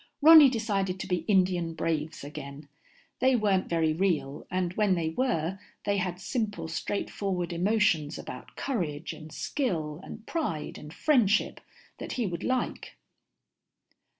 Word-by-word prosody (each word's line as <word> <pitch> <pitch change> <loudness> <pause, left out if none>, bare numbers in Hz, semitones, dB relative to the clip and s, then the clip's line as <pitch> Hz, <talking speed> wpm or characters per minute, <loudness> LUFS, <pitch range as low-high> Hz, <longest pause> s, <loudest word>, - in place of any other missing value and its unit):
Ronny 310 -2 +10
decided 200 -6 -1
to - - -4
be 180 -1 +1
Indian 180 -4 +2
braves 160 -2 -2
again. 145 0 -8 0.5
They 260 +1 +4
weren't 200 -5 +1
very 160 -2 +2
real, 160 -5 -1
and 180 -1 -1
when 205 -2 +2
they 165 -2 -1
were, 185 -3 -1 0.3
they 200 0 +1
had 180 -1 -2
simple 205 -5 -2
straightforward 180 +1 -2
emotions 175 -5 +2
about - - -9
courage 170 - -3
and 155 0 -11
skill 160 - -2
and 220 - -10
pride 285 - -3
and 150 - -10
friendship 220 - +2 0.4
that - - -5
he 245 - -1
would 175 -3 -4
like. 255 -1 -2
185 Hz, 135 wpm, -28 LUFS, 160-215 Hz, 0.5 s, Ronny